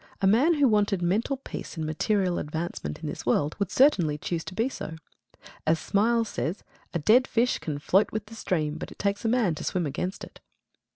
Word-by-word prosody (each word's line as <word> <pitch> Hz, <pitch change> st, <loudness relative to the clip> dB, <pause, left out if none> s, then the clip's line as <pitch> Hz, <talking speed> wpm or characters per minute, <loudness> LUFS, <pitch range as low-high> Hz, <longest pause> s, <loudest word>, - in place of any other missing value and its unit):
A -, -, +1 dB
man 255 Hz, -, +4 dB
who 290 Hz, -2 st, +4 dB
wanted 205 Hz, -4 st, +2 dB
mental 215 Hz, +10 st, +1 dB
peace 260 Hz, -, -8 dB
and 160 Hz, -, -2 dB
material 180 Hz, +3 st, 0 dB
advancement 150 Hz, -, -4 dB
in -, -, -3 dB
this -, -, -5 dB
world 145 Hz, +2 st, +1 dB
would 200 Hz, -3 st, 0 dB
certainly 180 Hz, -, +4 dB
choose 165 Hz, +2 st, -3 dB
to 185 Hz, -, -7 dB
be 225 Hz, +4 st, +1 dB
so. 160 Hz, -, -6 dB, 0.7 s
As 160 Hz, +1 st, +4 dB
Smiles 225 Hz, +6 st, +1 dB
says 180 Hz, 0 st, -3 dB, 0.3 s
"A -, -, -1 dB
dead 225 Hz, -, +4 dB
fish 240 Hz, +2 st, +1 dB
can 150 Hz, -3 st, -4 dB
float 190 Hz, +8 st, +2 dB
with 215 Hz, -1 st, -3 dB
the 220 Hz, -, -13 dB
stream, 155 Hz, -8 st, -2 dB
but -, -, -6 dB
it -, -, -12 dB
takes 200 Hz, +2 st, -1 dB
a -, -, +3 dB
man 225 Hz, -7 st, +2 dB
to 155 Hz, -, -6 dB
swim 180 Hz, -3 st, -1 dB
against 165 Hz, +7 st, -3 dB
it." -, -, -11 dB
195 Hz, 210 wpm, -27 LUFS, 160-225 Hz, 0.7 s, man